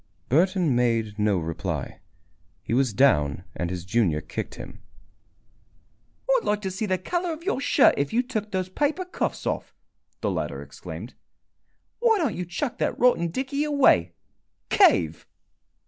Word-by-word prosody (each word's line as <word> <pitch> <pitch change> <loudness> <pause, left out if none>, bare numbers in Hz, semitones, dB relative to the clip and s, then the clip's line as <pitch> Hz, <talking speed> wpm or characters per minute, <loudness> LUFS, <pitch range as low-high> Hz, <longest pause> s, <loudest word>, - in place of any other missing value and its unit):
Burton 175 0 +3
made 115 -3 0
no 105 -2 +2
reply. 80 -1 -4 0.6
He - - -3
was 130 -1 +2
down 90 - +3
and 85 - -3
his 90 -1 -5
junior 95 -7 +1
kicked - - -6
him. - - -10 1.5
"I'd - - +3
like 210 0 0
to 190 - -2
see 210 +4 -3
the 185 -1 +1
color 350 - -2
of 320 +1 -7
your 365 -8 -1
shirt - - +5
if 140 0 -1
you 245 +2 +2
took 220 -5 -4
those 185 -2 -2
paper 295 - -1
cuffs 360 - -3
off!" - - -3 0.5
the - - 0
latter - - -3
exclaimed. - - -9 0.9
"Why 460 -2 +4
don't 310 - 0
you 180 - -4
chuck 235 - -4
that - - 0
rotten 240 -9 +3
dickey 265 - -2
away? 260 - +3 0.6
Cave!" 80 0 +3
180 Hz, 150 wpm, -25 LUFS, -, 1.5 s, shirt